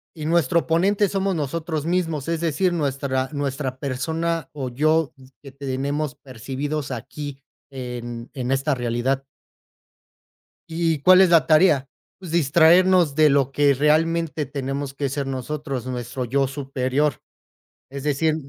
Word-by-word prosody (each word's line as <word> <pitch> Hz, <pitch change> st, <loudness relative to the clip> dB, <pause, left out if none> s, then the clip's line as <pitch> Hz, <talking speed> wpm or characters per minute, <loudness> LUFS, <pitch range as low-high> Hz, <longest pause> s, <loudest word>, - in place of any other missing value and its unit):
y 155 Hz, -2 st, -6 dB
nuestro 170 Hz, 0 st, +2 dB
ponente 195 Hz, +5 st, +2 dB
somos 195 Hz, 0 st, 0 dB
nosotros 160 Hz, +1 st, -3 dB
mismos, 165 Hz, -5 st, -1 dB
es 165 Hz, -1 st, -1 dB
decir, 170 Hz, +3 st, +1 dB
nuestra 135 Hz, -4 st, -1 dB
nuestra 140 Hz, -2 st, -3 dB
persona, 160 Hz, +4 st, -2 dB
o 135 Hz, -4 st, -4 dB
yo 155 Hz, +4 st, +1 dB, 0.3 s
que 140 Hz, -, -11 dB
tenemos 140 Hz, +2 st, -3 dB
percibidos 135 Hz, +3 st, -5 dB
aquí 140 Hz, +3 st, -7 dB, 0.3 s
en 120 Hz, -2 st, -6 dB
en 130 Hz, -1 st, -3 dB
esta 135 Hz, +2 st, +1 dB
realidad 120 Hz, +2 st, -1 dB, 1.5 s
y, 165 Hz, -2 st, 0 dB
¿cuál 185 Hz, +4 st, +7 dB
es 190 Hz, -, +5 dB
la 165 Hz, -2 st, +5 dB
tarea? 155 Hz, -4 st, +4 dB, 0.3 s
Pues, 180 Hz, -4 st, -9 dB
distraernos 170 Hz, +1 st, +4 dB
de 155 Hz, 0 st, +5 dB
lo 140 Hz, -1 st, +2 dB
que 145 Hz, 0 st, +3 dB
realmente 155 Hz, +2 st, +1 dB
tenemos 140 Hz, 0 st, -4 dB
que 140 Hz, 0 st, -2 dB
ser 140 Hz, 0 st, -3 dB
nosotros. 135 Hz, 0 st, -4 dB
Nuestro 125 Hz, 0 st, -4 dB
yo 135 Hz, +3 st, +1 dB
superior, 135 Hz, +1 st, -1 dB, 0.7 s
es 140 Hz, 0 st, -7 dB
decir 150 Hz, +2 st, +1 dB
145 Hz, 135 wpm, -23 LUFS, 135-160 Hz, 1.5 s, cuál